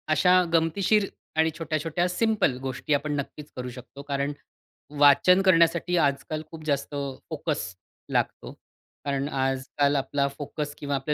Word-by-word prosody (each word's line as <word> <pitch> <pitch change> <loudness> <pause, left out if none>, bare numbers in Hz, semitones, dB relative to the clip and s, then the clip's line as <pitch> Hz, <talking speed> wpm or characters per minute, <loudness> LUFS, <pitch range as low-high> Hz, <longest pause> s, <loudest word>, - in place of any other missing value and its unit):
अशा 180 +4 +5
गमतीशीर 195 +5 +2 0.3
आणि 160 0 +3
छोट्या-छोट्या 165 +2 -1
सिंपल 200 - +1
गोष्टी 135 +3 -2
आपण 145 +1 0
नक्कीच 145 +1 -6
करू 125 0 -5
शकतो. 125 +3 -11
कारण 140 0 -2 0.7
वाचन 145 +6 +6
करण्यासाठी 170 -1 +3
आजकाल 155 +1 0
खूप 160 -1 -9
जास्त 145 -1 -1 0.3
फोकस 150 - -3 0.4
लागतो. - - -1 0.5
कारण 140 0 -1
आजकाल 135 +1 0
आपला 140 +1 0
फोकस 145 0 -5
किंवा 145 -1 -2
आपलं 135 +2 -1
145 Hz, 130 wpm, -26 LUFS, 140-165 Hz, 0.7 s, वाचन